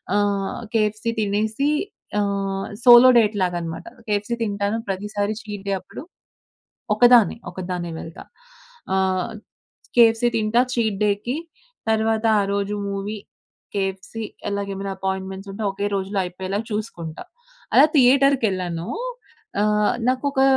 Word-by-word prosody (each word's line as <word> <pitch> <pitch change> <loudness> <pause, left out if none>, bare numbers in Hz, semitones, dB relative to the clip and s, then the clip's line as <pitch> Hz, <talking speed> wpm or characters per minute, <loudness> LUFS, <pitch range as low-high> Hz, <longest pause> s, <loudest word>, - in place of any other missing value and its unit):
ఆహ్, 200 -1 0 0.2
కేఎఫ్‌సీ 215 +1 +1
తినేసి 215 +7 0 0.5
ఆహ్, 195 -1 -2 0.2
సోలో 245 +1 +9
డేట్ 215 -1 +2
లాగానమాట. 175 -2 -3 0.2
కేఎఫ్‌సీ 210 +3 0
తింటాను 205 0 -1
ప్రతిసారి 205 +2 -2
చీట్ 205 -2 -8
డే 195 - +1
అప్పుడు. - - -10 0.9
ఒకదాన్నే. 240 -1 +6
ఒకదాన్నే 180 -2 -4
వెళ్తా. 165 - -9 0.7
ఆహ్, 190 +2 0 0.7
కేఎఫ్‌సీ 230 0 +5
తింటా 220 +2 +3
చీట్ 220 -4 0
డే‌కి 210 +7 -1 0.5
తరువాత 220 0 +1
ఆ - - +3
రోజు 200 0 -1 0.2
మూవీ, 200 +2 -4 0.6
కేఎఫ్‌సీ 195 +3 -3 0.3
అలాగే 200 0 -3
ఏమైనా 195 0 -4
అపాయింట్మెంట్స్ 190 0 -4
ఉంటే 215 +3 -5
ఒకే 200 +1 -2
రోజులో 195 +1 -3
అయిపోయేలాగా 190 +4 -4
చూసుకుంటా. 170 -7 -5 0.5
అలా - - +8
థియేటర్‌కెళ్ళానూ 230 - +3 0.7
ఆహ్, 210 0 +2
నాకు 255 +2 +1
ఒక 265 - +1
205 Hz, 115 wpm, -22 LUFS, 195-225 Hz, 0.9 s, సోలో